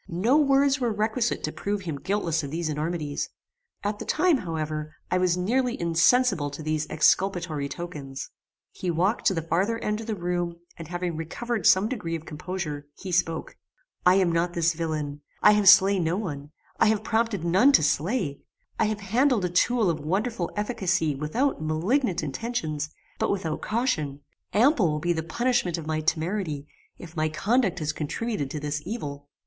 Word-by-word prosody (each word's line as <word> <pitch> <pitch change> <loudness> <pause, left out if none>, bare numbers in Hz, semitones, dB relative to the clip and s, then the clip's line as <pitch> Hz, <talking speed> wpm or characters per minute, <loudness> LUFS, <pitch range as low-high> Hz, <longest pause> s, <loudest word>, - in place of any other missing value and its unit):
No 195 +11 +2
words 275 -1 +4
were 240 -3 +1
requisite 220 +3 0
to 155 - -1
prove 205 +4 -3
him 160 -7 -5
guiltless 180 -5 0
of 140 - -5
these 165 +2 -2
enormities: 150 -1 -2 0.5
at 205 0 -2
the - - -4
time, 355 -5 +3
however, 155 -5 -4 0.2
I 185 - +3
was 180 -1 +2
nearly 245 +7 0
insensible 170 - +3
to 145 +2 -8
these 155 0 -1
exculpatory 165 -4 +1
tokens. 145 -6 -7 0.4
He 185 - -4
walked 180 +7 +1
to 190 - +3
the 165 - -2
farther 190 +8 0
end 210 -1 -2
of 225 - -9
the 220 - -1
room, 175 -1 -2 0.2
and 165 - -9
having 175 0 -3
recovered 190 +6 -2
some 190 +3 +5
degree 210 -10 -3
of 160 -1 -7
composure, 150 -2 -5
he 190 - -6
spoke 165 -2 0 0.5
"I 180 +1 +6
am 185 -3 +3
not 170 +1 0
this 170 0 +2
villain; 155 -3 -3 0.2
I 210 - +9
have 210 -2 +6
slain 195 -2 +6
no 165 +3 0
one; 145 -8 -5 0.3
I 225 - +5
have 215 -1 +2
prompted 220 -5 0
none 190 +11 +5
to 155 - +6
slay; 150 - 0 0.4
I - - +4
have 215 0 -2
handled 230 +1 +2
a - - 0
tool 225 +5 +2
of 165 -3 0
wonderful 190 +5 -1
efficacy 190 -7 0
without 155 - -1
malignant 175 - 0
intentions, 155 - -3 0.3
but - - +1
without 170 -6 -2
caution; 160 - -1 0.3
ample 230 - +4
will 150 0 -1
be 175 +3 +1
the 160 - -2
punishment 180 +1 0
of 165 - -6
my 155 0 -1
temerity, 160 -2 -1 0.3
if 170 -1 -11
my 155 0 +1
conduct 195 +4 +1
has 155 -2 -2
contributed 155 - -3
to 150 - -4
this 150 +1 -3
evil." 145 -8 -6
175 Hz, 175 wpm, -26 LUFS, 155-215 Hz, 0.5 s, I